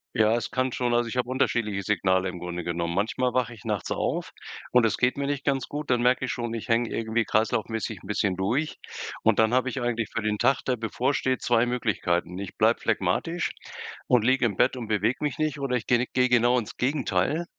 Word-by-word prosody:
Ja, 110 +1 +4
es 120 - -3
kann 130 0 0
schon 120 -1 -1
also, 120 0 +1
ich 125 - -5
habe 125 0 0
unterschiedliche 110 -6 0
Signale 95 -1 +1
im 90 - -7
Grunde 90 0 -5
genommen. 85 0 -2
Manchmal 120 +5 0
wache 125 -2 0
ich 110 -1 -15
nachts 105 -4 -2
auf - - -2 0.4
und 125 -2 +5
es 110 - +1
geht 125 +2 +1
mir 140 0 -1
nicht 140 -1 -2
ganz 135 -3 0
gut. 145 -1 -5
Dann 120 -1 +2
merke 125 +1 +3
ich - - -2
schon, 120 -2 -3
ich 115 - -6
hänge 115 0 +2
irgendwie 115 0 -1
kreislaufmäßig 110 -1 -1
'n - - -13
bisschen 100 -2 0
durch. 125 +11 -1 0.4
Und - - +4
dann 110 +2 +3
habe 130 +1 +2
ich 130 +1 -4
eigentlich 115 -3 -1
für 115 - -3
den 105 0 0
Tag, 135 +4 +2
der 125 -2 0
bevorsteht, 130 +3 -1
2 120 0 +3
Möglichkeiten: 95 -7 -1
Ich 100 - -7
bleibe - - +3
phlegmatisch 170 +1 0 0.6
und 125 -3 +4
liege 130 0 +3
im 100 -5 0
Bett 130 +4 +2
und 115 -3 -5
bewege 110 +3 +1
mich 145 -4 -1
nicht 155 -2 -1
oder 135 -2 -1
ich 115 - -3
gehe 120 -1 +4
ne 125 - -1
gehe 125 0 +3
genau 120 +1 +4
ins 115 - -4
Gegenteil 135 - 0
120 Hz, 225 wpm, -26 LUFS, 105-130 Hz, 0.6 s, und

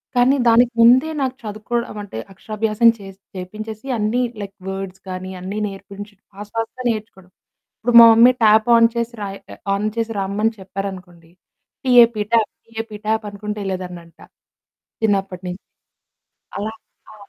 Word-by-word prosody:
కానీ, 250 +3 +4
దానికి 235 +1 +5
ముందే 255 +6 +6
నాకు 260 -1 -1
చదువుకోవడమంటే 215 - -4 0.2
అక్షరాభ్యాసం 215 +3 +1
చేసి 195 -1 -12 0.2
చేపించేసి 215 +6 -7
అన్నీ 220 +4 0 0.2
లైక్ 200 -1 -8
వర్డ్స్ 190 -1 -6
గానీ 185 0 -6
అన్నీ 190 +3 -5
నేర్పించి, 200 +1 -10 0.2
ఫాస్ట్ 205 +1 -10
ఫాస్ట్‌గా 225 +3 -4
నేర్చుకోవడం. 210 -5 -6 0.5
ఇప్పుడు 240 +2 0
మా - - +11
మమ్మీ, 235 +3 +7
ట్యాప్ 215 +1 +5
ఆన్ 230 0 +6
చేసి 235 0 -2
రాయ్ 195 -1 -5
ఆ - - -10 0.2
ఆన్ 205 +2 -1
చేసి 230 0 -1
రమ్మని 205 +4 0
చెప్పారనుకోండి, 185 -3 -8 0.5
టీ-ఏ-పీ 235 -4 +5
ట్యాప్, 225 -2 +3
టీ-ఏ-పీ 225 -1 -7
ట్యాప్ 220 0 0
అనుకుంటా 210 +1 -6
ఎళ్ళేదాన్నంట 180 -3 -6 0.8
చిన్నప్పటి 195 -3 0
నించి. 180 +2 -7 0.9
అలా. 215 +2 -3 0.4
ఆ! - - -14
210 Hz, 135 wpm, -20 LUFS, 195-230 Hz, 0.9 s, మా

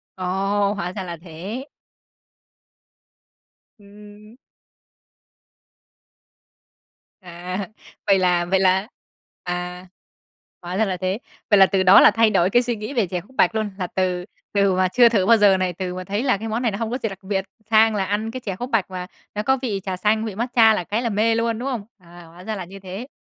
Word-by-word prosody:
Ồ, 195 +2 0
hóa 180 -3 -4
ra 190 -1 -5
là 170 -2 -6
thế. 190 +10 -7 2.1
Ừm. 210 +2 -15 2.8
À, 180 +1 -6 0.4
vậy 195 -1 +5
là 180 -1 +2
vậy 190 +2 +1
là 190 +2 +2 0.6
à, 180 0 -5 0.7
hóa 180 +1 -5
ra 220 - +3
là 185 -2 -2
thế. 185 +4 -2 0.3
Vậy 205 - +6
là 195 - +9
từ 190 -1 +1
đó 185 +2 +8
là - - +7
thay 225 +1 +3
đổi 190 -3 +2
cái 240 - +4
suy 240 -1 -2
nghĩ 215 +4 -6
về 230 -7 +1
chè 180 0 -3
khúc 240 +9 -22
bạch 225 - +3
luôn, 215 -2 -1
là 180 - -2
từ 180 -1 -2 0.3
từ 200 -2 +3
mà 185 0 +2
chưa 235 +5 +5
thử 205 -5 +1
bao 230 +3 +6
giờ 205 -2 +5
này, 185 -1 -1
từ 180 +1 -4
mà 185 - -5
thấy 205 +5 -2
là 255 -6 +2
cái 220 +3 -6
món 225 +2 -2
này 235 -3 +1
nó 195 - -4
hông 225 0 -3
có 250 - -1
gì 225 - 0
đặc 195 - -9
biệt 190 0 -2 0.2
sang 220 0 +5
là 195 - 0
ăn 210 +3 -2
cái 255 - -6
chè 200 -6 -5
khúc 245 +6 -6
bạch 205 -4 0
mà 180 -1 -5 0.3
nó 210 - -2
có 265 +4 +2
vị 215 -7 -2
trà 190 -2 -4
xanh, 215 +3 +1
vị 215 -4 -5
matcha 230 0 +4
là 195 - -1
cái 210 +6 -2
là 235 - -1
mê 220 +2 +2
luôn, 230 0 -1
đúng 265 - -3
không? 235 -6 -4
À, 175 -2 -15
hóa 175 +2 -14
ra 220 +2 -4
là 190 -3 -6
như 195 +3 -11
thế. 195 +6 -8
200 Hz, 210 wpm, -22 LUFS, 185-220 Hz, 2.8 s, là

